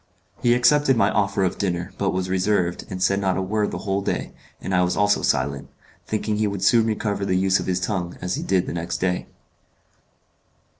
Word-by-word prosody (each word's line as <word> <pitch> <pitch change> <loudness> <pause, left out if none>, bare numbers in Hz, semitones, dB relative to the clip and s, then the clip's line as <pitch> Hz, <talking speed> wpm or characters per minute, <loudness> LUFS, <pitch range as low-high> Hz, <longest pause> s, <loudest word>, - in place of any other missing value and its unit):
He 120 0 +4
accepted 135 +1 +4
my 100 -1 +3
offer 100 -2 +1
of 90 -1 -1
dinner, 90 -2 -2
but 100 - +1
was 95 0 -1
reserved, 95 -1 0
and 95 0 -3
said 100 +1 +2
not 95 -2 0
a - - 0
word 105 +2 0
the - - -5
whole 100 0 0
day, - - -3 0.3
and 95 - -4
I 90 - +4
was 90 0 0
also 105 0 +3
silent, 70 +1 -1 0.4
thinking 110 0 -1
he 105 0 +1
would 100 -2 -4
soon 115 +2 +4
recover 105 -2 -1
the 95 -2 +1
use 95 +1 +2
of - - -5
his 90 -1 0
tongue, 90 -3 -3
as 90 0 -3
he - - -2
did 95 -1 +1
the - - -5
next 85 0 -3
day. 90 -1 -1
95 Hz, 210 wpm, -23 LUFS, 90-105 Hz, 0.4 s, He